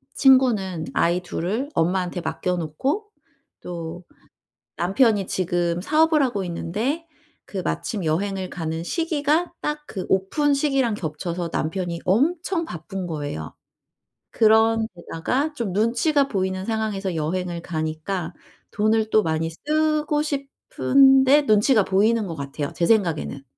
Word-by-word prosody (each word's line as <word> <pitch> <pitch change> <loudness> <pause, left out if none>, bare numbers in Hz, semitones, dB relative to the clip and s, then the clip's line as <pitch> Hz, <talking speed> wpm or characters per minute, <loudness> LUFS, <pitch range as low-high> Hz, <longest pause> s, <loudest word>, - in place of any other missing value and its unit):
친구는 215 - +3
아이 175 +2 +2
2 175 -1 -5
을 240 +10 -1
엄마한테 180 +1 0
맡겨 180 +1 -2
놓고 265 - -2 0.5
또 170 0 -6 0.7
남편이 200 +2 +2
지금 175 -1 -1
사업을 310 - +3
하고 210 -7 -1
있는데 215 - -2 0.4
그 200 - -8
마침 195 +2 -3
여행을 190 +4 -1
가는 160 -1 -4
시기가 320 - 0
딱 300 0 -3
그 190 - -5
오픈 280 +11 +2
시기랑 275 -5 +1
겹쳐서 170 +1 -4
남편이 170 +1 -2
엄청 330 - +1
바쁜 180 - -6
거예요. 145 - -5 0.8
그런 225 0 +4
데다가 250 - -2
좀 230 -10 -3
눈치가 245 +7 +2
보이는 190 -1 -1
상황에서 210 -4 -2
여행을 170 +2 -2
가니까 160 +2 -3 0.4
돈을 215 +1 +1
또 215 -2 +4
많이 160 0 -1
쓰고 300 - 0
싶은데 275 - +3
눈치가 215 -1 +4
보이는 210 +3 +2
것 165 - -5
같아요 140 0 -4
제 170 - +1
생각에는. 170 -10 +1
195 Hz, 270 characters per minute, -23 LUFS, 170-270 Hz, 0.8 s, 그런